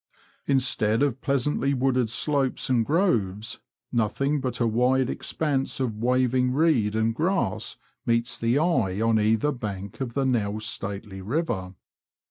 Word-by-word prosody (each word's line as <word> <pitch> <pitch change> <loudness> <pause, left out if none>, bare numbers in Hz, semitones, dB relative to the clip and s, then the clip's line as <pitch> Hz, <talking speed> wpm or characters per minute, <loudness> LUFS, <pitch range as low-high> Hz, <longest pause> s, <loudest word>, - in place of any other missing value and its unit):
Instead 130 -3 +2
of 135 -3 -1
pleasantly 140 0 0
wooded 130 -2 +1
slopes 135 +2 0
and 120 -3 +3
groves, 115 - 0 0.3
nothing 135 +5 0
but 130 -2 -3
a 120 - +2
wide 125 +3 +2
expanse 140 -4 -2
of 125 -5 -1
waving 125 +1 +2
reed 130 -9 +2
and 110 +1 +1
grass 160 - -1 0.3
meets 115 0 +1
the 115 +3 +1
eye 130 - +1
on 115 0 +3
either 110 +7 +2
bank 100 -4 -6
of 120 -3 -4
the 140 - +1
now 110 -5 0
stately 100 -2 -5
river. 105 - -2
125 Hz, 135 wpm, -25 LUFS, 110-135 Hz, 0.3 s, and